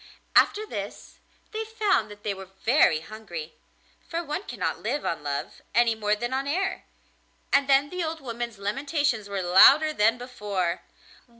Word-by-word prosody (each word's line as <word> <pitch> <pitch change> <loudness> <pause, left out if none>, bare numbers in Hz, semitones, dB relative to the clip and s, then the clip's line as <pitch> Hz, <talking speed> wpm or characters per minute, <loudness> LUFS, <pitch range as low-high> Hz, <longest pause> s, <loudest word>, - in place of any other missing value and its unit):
After 425 +1 +4
this - - -7 0.3
they 440 0 -3
found 425 - 0
that 205 0 -13
they 205 - -1
were 190 0 -9 0.2
very 225 - +4
hungry, 170 -4 -8 0.6
for 335 0 -2
one 300 +3 -3
cannot - - -3
live 290 - -2
on 165 - -2
love, 140 -1 -4
any 235 -1 +4
more 210 -1 0
than 240 +4 -4
on 270 +1 -1
air, 380 +6 -1 0.7
and 280 0 +3
then 275 +1 +4
the 360 -1 -2
old 320 0 -3
woman's 235 -4 -5
lamentations 245 +1 -1
were 195 -2 -2
louder 280 - +7
than 225 -1 +3
before. 205 -8 -3
240 Hz, 160 wpm, -26 LUFS, 205-300 Hz, 0.7 s, louder